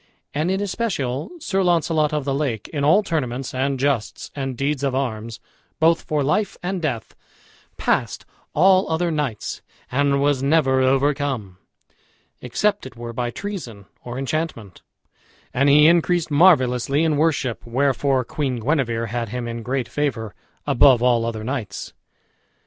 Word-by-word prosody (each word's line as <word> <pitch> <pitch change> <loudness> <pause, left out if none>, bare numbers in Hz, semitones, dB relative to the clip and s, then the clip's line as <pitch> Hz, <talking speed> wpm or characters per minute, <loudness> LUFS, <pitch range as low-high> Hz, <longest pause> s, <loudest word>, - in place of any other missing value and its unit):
And 155 +4 0
in 190 +1 0
especial 175 - -2
Sir 195 - -1
Launcelot 165 -4 +2
of 150 -2 -2
the 140 - 0
Lake 135 -7 -2
in 145 -3 -3
all 160 +9 +5
tournaments 135 -7 -3
and 135 +1 -1
justs 135 -5 -1
and 135 -3 -4
deeds 140 +1 -1
of 135 -2 0
arms, 115 -3 -3 0.4
both 165 +1 +4
for 150 -2 -1
life 175 +9 0
and 185 0 -2
death, 125 -8 -3 0.6
passed - - -1 0.3
all 185 +4 +4
other 165 +1 0
knights, 145 -9 -3 0.3
and 140 +1 +2
was 140 -1 +2
never 135 -2 +3
overcome, 135 -7 0 0.8
except 130 - 0
it 130 - -14
were 120 0 -7
by 120 +1 -2
treason 125 - -7 0.2
or 120 0 -6
enchantment; 135 - -4 0.7
and 135 +3 +3
he 150 +2 +7
increased 170 0 +3
marvellously 140 -3 +4
in 160 -2 +2
worship, 145 -5 0
wherefore 135 +1 +1
Queen 140 -3 -2
Guenever 120 -3 0
had 115 0 -3
him 120 +1 -4
in 115 0 -5
great 125 +1 -2
favor, 120 -5 -2 0.3
above 135 -3 +5
all 120 -2 +3
other 110 -2 -4
knights. 125 -2 -5
140 Hz, 145 wpm, -22 LUFS, 120-155 Hz, 0.8 s, he